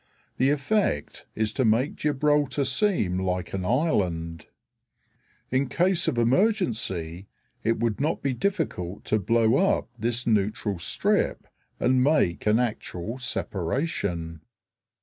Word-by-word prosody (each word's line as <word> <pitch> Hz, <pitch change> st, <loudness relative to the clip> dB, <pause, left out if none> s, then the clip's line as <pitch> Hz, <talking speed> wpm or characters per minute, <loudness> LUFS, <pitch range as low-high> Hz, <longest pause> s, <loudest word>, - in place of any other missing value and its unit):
The 130 Hz, -, +3 dB
effect 145 Hz, -, -1 dB
is 110 Hz, 0 st, -1 dB
to 130 Hz, -, 0 dB
make 120 Hz, +5 st, +2 dB
Gibraltar 145 Hz, -1 st, +1 dB
seem 130 Hz, -, +1 dB
like 90 Hz, -1 st, -2 dB
an 95 Hz, -1 st, -2 dB
island. 90 Hz, -, -1 dB, 1.0 s
In 130 Hz, +1 st, +1 dB
case 180 Hz, +4 st, +2 dB
of -, -, 0 dB
emergency 115 Hz, -, 0 dB, 0.4 s
it 115 Hz, +1 st, +1 dB
would 115 Hz, 0 st, -1 dB
not 155 Hz, +3 st, -1 dB
be 135 Hz, -1 st, 0 dB
difficult 125 Hz, -, -2 dB
to 110 Hz, -, +1 dB
blow 115 Hz, +3 st, +3 dB
up 195 Hz, -8 st, +1 dB
this 120 Hz, +2 st, 0 dB
neutral 105 Hz, -3 st, 0 dB
strip -, -, 0 dB, 0.3 s
and 125 Hz, +1 st, +3 dB
make 135 Hz, -, +2 dB
an 105 Hz, +1 st, +4 dB
actual 115 Hz, -1 st, -3 dB
separation. 90 Hz, -, -2 dB
115 Hz, 120 wpm, -26 LUFS, 95-145 Hz, 1.0 s, an